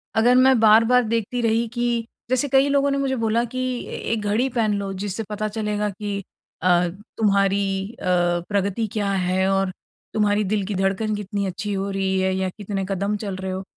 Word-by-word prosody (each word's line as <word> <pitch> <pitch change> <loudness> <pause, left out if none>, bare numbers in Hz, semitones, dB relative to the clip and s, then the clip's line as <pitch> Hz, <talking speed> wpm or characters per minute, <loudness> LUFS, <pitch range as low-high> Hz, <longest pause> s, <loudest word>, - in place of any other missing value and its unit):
अगर 240 +3 +4
मैं 255 -1 +5
बार-बार 225 +3 +5
देखती 230 +2 -1
रही 230 0 +1
कि 240 -1 0 0.2
जैसे 255 +2 +1
कई 270 +1 +4
लोगों 280 0 +2
ने 275 - 0
मुझे 270 -1 0
बोला 230 0 +1
कि, 255 +2 -6 0.3
"ए - - -6 0.2
एक 225 -2 0
घड़ी 210 +5 +1
पहन 225 -4 +1
लो, 200 -1 -4
जिससे 200 +3 -3
पता 215 0 -2
चलेगा 210 -1 -2
कि 200 0 -4 0.4
अ, 180 -1 +3 0.3
तुम्हारी 200 -2 +2 0.3
अ, 220 - -10 0.4
प्रगति 200 +2 0
क्या 205 -2 0
है 190 0 +1
और 195 -1 +1 0.4
तुम्हारी 210 -1 +2
दिल 205 +1 0
की 205 - -3
धड़कन 195 +3 0
कितनी 205 0 -3
अच्छी 195 +2 -3
हो 195 0 -2
रही 190 -1 0
है 190 0 +1
या 190 0 -1
कितने 200 -2 -3
कदम 200 +2 -1
चल 195 -2 -3
रहे 190 0 -4
हो।" 190 +1 -4
210 Hz, 190 wpm, -23 LUFS, 195-230 Hz, 0.4 s, मैं